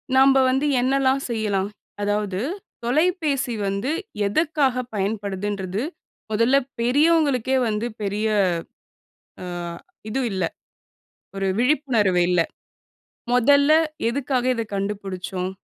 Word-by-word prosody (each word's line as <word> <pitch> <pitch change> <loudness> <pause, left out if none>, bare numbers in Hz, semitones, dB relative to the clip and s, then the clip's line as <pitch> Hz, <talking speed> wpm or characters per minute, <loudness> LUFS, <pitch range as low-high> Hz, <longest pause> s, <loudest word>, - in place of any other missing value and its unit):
நாம்ப 270 +1 +6
வந்து 265 +3 +1 0.2
என்னெல்லாம் 270 +1 +2
செய்யலாம். 205 -4 -1 0.3
அதாவது 205 -2 -1 0.4
தொலைபேசி 290 -1 +1
வந்து 200 +9 -1 0.4
எதுக்காக 275 0 +1
பயன்படுதுன்றது 200 -1 -2 0.5
மொதல்ல 230 +5 +3 0.2
பெரியவங்களுக்கே 270 0 +3
வந்து 215 +1 -1 0.2
பெரிய 210 +2 -1 1.2
ஆ - - -5 0.6
இது 260 - -1
இல்ல, 190 -1 -1 0.9
ஒரு 195 0 -1
விழிப்புணர்வு 240 -9 +2
இல்லை. 180 -2 +3 0.9
மொதல்ல 280 +4 +5 0.4
எதுக்காக 255 -1 -1
இதை 230 -1 -2
கண்டுபிடிச்சோம். 195 -2 -3
230 Hz, 90 wpm, -23 LUFS, 200-270 Hz, 1.2 s, நாம்ப